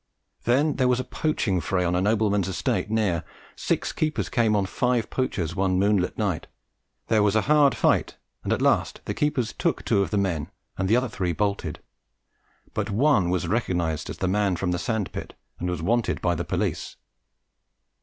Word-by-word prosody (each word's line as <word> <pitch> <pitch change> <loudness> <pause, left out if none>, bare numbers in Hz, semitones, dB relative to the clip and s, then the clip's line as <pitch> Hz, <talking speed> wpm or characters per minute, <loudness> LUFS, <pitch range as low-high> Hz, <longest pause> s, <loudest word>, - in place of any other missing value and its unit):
Then 140 +6 +2
there 130 -2 +3
was 125 0 +2
a - - -1
poaching 115 - -1
fray 90 +3 0
on 85 - +1
a 90 - +1
nobleman's 105 -1 +2
estate 95 +2 -1
near. 105 -7 +1 0.3
Six - - -1
keepers 155 -1 -1
came 115 -4 +2
on 100 -2 +2
five 120 +3 0
poachers 90 - -2
one 95 -1 +1
moonlight 100 -2 +1
night. 100 -7 -1 0.6
There 110 -2 +3
was 105 0 +2
a 110 - +4
hard 145 0 +4
fight, - - +2 0.3
and - - -2
at - - +1
last - - +1
the - - -2
keepers 145 -6 0
took - - -1
two 100 - +3
of 100 - -1
the 105 - -1
men 90 -7 -1 0.3
and 95 - -1
the 115 - +5
other 125 +1 +1
three 90 -6 -2
bolted, 90 -3 -2 0.9
but - - -2
one 110 -4 +3
was 90 -2 0
recognized 90 -6 -1
as - - -6
the 95 - -1
man 100 0 +1
from 90 +1 -1
the 90 - -1
sand 110 -4 -2
pit - - -7 0.2
and 90 - -2
was 90 -2 -3
"wanted" 120 +5 +1
by 90 - +1
the 85 +1 -3
police. - - -2
100 Hz, 190 wpm, -25 LUFS, 90-120 Hz, 0.9 s, the